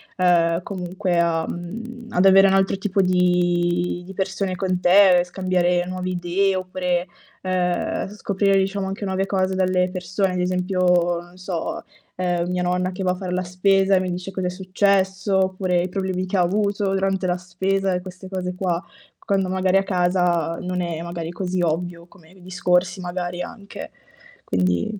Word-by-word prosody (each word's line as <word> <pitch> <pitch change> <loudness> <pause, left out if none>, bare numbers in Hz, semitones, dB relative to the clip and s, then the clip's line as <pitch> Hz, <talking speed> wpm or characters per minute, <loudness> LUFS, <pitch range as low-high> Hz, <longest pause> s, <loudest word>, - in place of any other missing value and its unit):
ehm, 170 -1 +3
comunque 180 -1 -2
a, 165 -1 +1
mhmm, 230 +7 -7
ad 180 +2 +2
avere 195 0 +7
un 190 - +3
altro 195 0 +2
tipo 195 0 0
di 175 -1 +1
di 195 - -9
persone 190 0 -2
con 185 -1 -1
te, 180 0 +6
scambiare 180 -1 0
nuove 185 0 -4
idee 180 +2 0
oppure, 185 -1 -1 0.3
ehm, 180 -1 -1
scoprire, 200 -1 0
diciamo, 195 0 0
anche 195 +2 -5
nuove 190 0 0
cose 190 -1 0
dalle 185 -1 +1
persone, 185 +1 -1
ad 180 - -2
esempio, 180 -1 +1
non 175 +1 -14
so, 185 -2 -4 0.3
ehm, 175 -1 -1
mia 180 0 -1
nonna 180 +1 0
che 190 - -4
va 180 - +2
a - - -1
far 180 -1 -4
la 180 0 0
spesa, 195 +2 +2
e - - +4
mi 185 -1 -2
dice 180 +2 -5
cosa 185 -1 -2
è - - 0
successo, 190 +1 +1
oppure 185 -1 +1
i 180 - -2
problemi 185 0 -2
che 185 +2 -2
avuto 200 +2 +1
durante 195 -1 0
la 175 - +1
spesa 190 +2 -1
e 180 - 0
queste 185 +1 -10
cose 180 -1 -3
qua, 180 -2 -1 0.4
quando 195 -1 +1
magari 185 0 +2
a 195 - +2
casa, 175 -3 +1
non 180 0 -2
è 170 -2 -3
magari 170 -1 -5
così 185 0 -2
ovvio 170 +1 -2
come 175 -2 -20
discorsi 180 0 0
magari 175 0 -4
anche. 200 +1 -8 0.5
Quindi 90 - 0
185 Hz, 170 wpm, -22 LUFS, 180-190 Hz, 0.5 s, avere